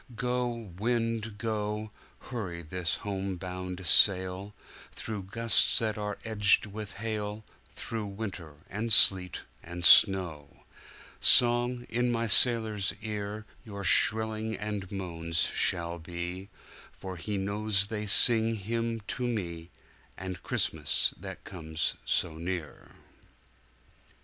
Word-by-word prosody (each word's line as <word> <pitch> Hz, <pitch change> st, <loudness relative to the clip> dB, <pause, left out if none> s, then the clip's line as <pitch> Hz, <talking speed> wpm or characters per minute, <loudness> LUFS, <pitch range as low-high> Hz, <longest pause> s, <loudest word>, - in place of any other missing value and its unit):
Go, 125 Hz, +1 st, -2 dB, 0.3 s
wind, 115 Hz, -2 st, -2 dB
go, 105 Hz, -1 st, -4 dB, 0.3 s
Hurry 90 Hz, -9 st, -7 dB
his 90 Hz, 0 st, -2 dB
home 95 Hz, -1 st, -4 dB
bound 90 Hz, 0 st, -7 dB
sail, 95 Hz, +3 st, +2 dB, 0.4 s
Through 105 Hz, -4 st, -7 dB
gusts 115 Hz, +2 st, +2 dB
that 110 Hz, -2 st, +1 dB
are 105 Hz, -1 st, -5 dB
edged 105 Hz, -2 st, +3 dB
with 105 Hz, 0 st, -8 dB
hail, 105 Hz, 0 st, -6 dB, 0.3 s
Through 110 Hz, -2 st, -5 dB
winter, 100 Hz, -7 st, -8 dB
and 110 Hz, +4 st, -5 dB
sleet, 95 Hz, -3 st, +4 dB, 0.2 s
and 85 Hz, +1 st, -7 dB
snow; 85 Hz, -9 st, +4 dB, 0.6 s
Song, 120 Hz, 0 st, +4 dB
in 120 Hz, +1 st, -1 dB
my 115 Hz, 0 st, -1 dB
sailor's 110 Hz, -2 st, +6 dB
ear, 105 Hz, 0 st, -6 dB, 0.2 s
Your 100 Hz, -4 st, -9 dB
shrilling 110 Hz, +3 st, +2 dB
and 105 Hz, -1 st, -6 dB
moans 85 Hz, -4 st, 0 dB
shall 85 Hz, 0 st, 0 dB
be, 90 Hz, +3 st, -6 dB, 0.4 s
For 95 Hz, -1 st, -9 dB
he 100 Hz, +4 st, -4 dB
knows 100 Hz, 0 st, 0 dB
they 105 Hz, 0 st, -5 dB
sing 115 Hz, +2 st, +5 dB
him 115 Hz, +2 st, -4 dB
to 105 Hz, -, -7 dB
meAnd 90 Hz, -2 st, -8 dB
Christmas -, -, 0 dB
that -, -, -10 dB
comes 80 Hz, -3 st, -4 dB
so 80 Hz, -2 st, -1 dB
near. 85 Hz, -3 st, -7 dB
105 Hz, 110 wpm, -28 LUFS, 90-110 Hz, 0.6 s, sailor's